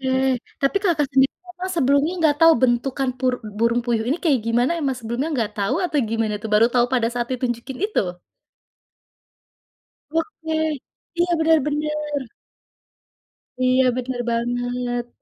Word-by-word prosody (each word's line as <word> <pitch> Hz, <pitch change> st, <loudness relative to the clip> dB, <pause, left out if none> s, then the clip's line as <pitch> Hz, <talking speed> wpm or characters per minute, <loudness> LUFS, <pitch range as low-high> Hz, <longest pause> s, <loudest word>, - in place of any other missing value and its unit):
Oke. 265 Hz, -, -2 dB, 0.5 s
Tapi 275 Hz, +7 st, +1 dB
Kakak 315 Hz, -6 st, +2 dB
sendiri 265 Hz, +1 st, +4 dB, 0.2 s
memang 365 Hz, +1 st, -6 dB
sebelumnya 280 Hz, +3 st, +3 dB
nggak 300 Hz, -2 st, +3 dB
tahu 330 Hz, 0 st, +9 dB
bentukan 255 Hz, +2 st, +1 dB
pur 255 Hz, -1 st, +1 dB, 0.3 s
burung 235 Hz, +1 st, +2 dB
puyuh 230 Hz, -2 st, 0 dB
ini 300 Hz, +6 st, 0 dB
kayak 275 Hz, -7 st, +3 dB
gimana, 240 Hz, +6 st, +2 dB
emang 270 Hz, -3 st, -1 dB
sebelumnya 240 Hz, +6 st, -3 dB
nggak 225 Hz, -4 st, -1 dB
tahu 200 Hz, -1 st, 0 dB
atau 305 Hz, -4 st, 0 dB
gimana 225 Hz, -2 st, 0 dB
tuh? 220 Hz, -, -5 dB
Baru 220 Hz, +2 st, +6 dB
tau 240 Hz, -1 st, +5 dB
pada 235 Hz, -3 st, +2 dB
saat 240 Hz, -1 st, -1 dB
ditunjukin 250 Hz, 0 st, -3 dB
itu? 430 Hz, -, 0 dB, 2.2 s
Oke. 325 Hz, -2 st, -2 dB, 0.6 s
Iya, 350 Hz, 0 st, +2 dB
bener 320 Hz, 0 st, +4 dB
bener. 300 Hz, -1 st, -2 dB, 1.4 s
Iya, 255 Hz, +1 st, +4 dB
bener 250 Hz, 0 st, -3 dB
banget. 245 Hz, +1 st, -2 dB
260 Hz, 140 wpm, -22 LUFS, 240-300 Hz, 2.2 s, tahu